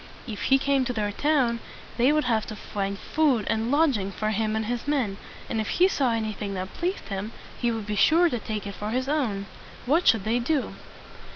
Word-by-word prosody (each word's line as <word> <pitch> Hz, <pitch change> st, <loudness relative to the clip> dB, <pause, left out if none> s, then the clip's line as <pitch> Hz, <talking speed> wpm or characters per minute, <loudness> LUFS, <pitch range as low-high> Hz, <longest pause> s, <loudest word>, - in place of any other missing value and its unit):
If 215 Hz, -5 st, -5 dB
he 270 Hz, -, +5 dB
came 275 Hz, 0 st, +2 dB
to 250 Hz, -, -2 dB
their 210 Hz, -2 st, -1 dB
town, 255 Hz, -2 st, +1 dB, 0.4 s
they 250 Hz, +4 st, +4 dB
would 305 Hz, 0 st, +2 dB
have 225 Hz, -4 st, 0 dB
to 215 Hz, -, -6 dB
find 200 Hz, -1 st, -4 dB
food 270 Hz, -5 st, +1 dB
and 225 Hz, +1 st, 0 dB
lodg 290 Hz, -2 st, +3 dB
ing 195 Hz, 0 st, -3 dB
for 215 Hz, +2 st, -2 dB
him 215 Hz, 0 st, 0 dB
and 220 Hz, 0 st, -1 dB
his 240 Hz, +3 st, -3 dB
men; 250 Hz, -10 st, 0 dB, 0.3 s
and 225 Hz, -, -1 dB
if 215 Hz, -, -4 dB
he 365 Hz, -, +6 dB
saw 270 Hz, -9 st, +1 dB
anything 215 Hz, -3 st, -2 dB
that 185 Hz, 0 st, -5 dB
pleased 360 Hz, -, -3 dB
him, 200 Hz, +2 st, -4 dB, 0.3 s
he 240 Hz, -, +1 dB
would 225 Hz, -2 st, -3 dB
be 210 Hz, 0 st, -2 dB
sure 330 Hz, -, +5 dB
to 245 Hz, -8 st, -1 dB
take 215 Hz, -1 st, -4 dB
it 200 Hz, -, -5 dB
for 210 Hz, +2 st, -5 dB
his 255 Hz, +3 st, -1 dB
own. 240 Hz, -10 st, 0 dB, 0.4 s
What 315 Hz, +8 st, +2 dB
should 225 Hz, -4 st, +5 dB
they 225 Hz, +3 st, +1 dB
do? 270 Hz, +3 st, 0 dB
230 Hz, 220 wpm, -26 LUFS, 210-275 Hz, 0.4 s, he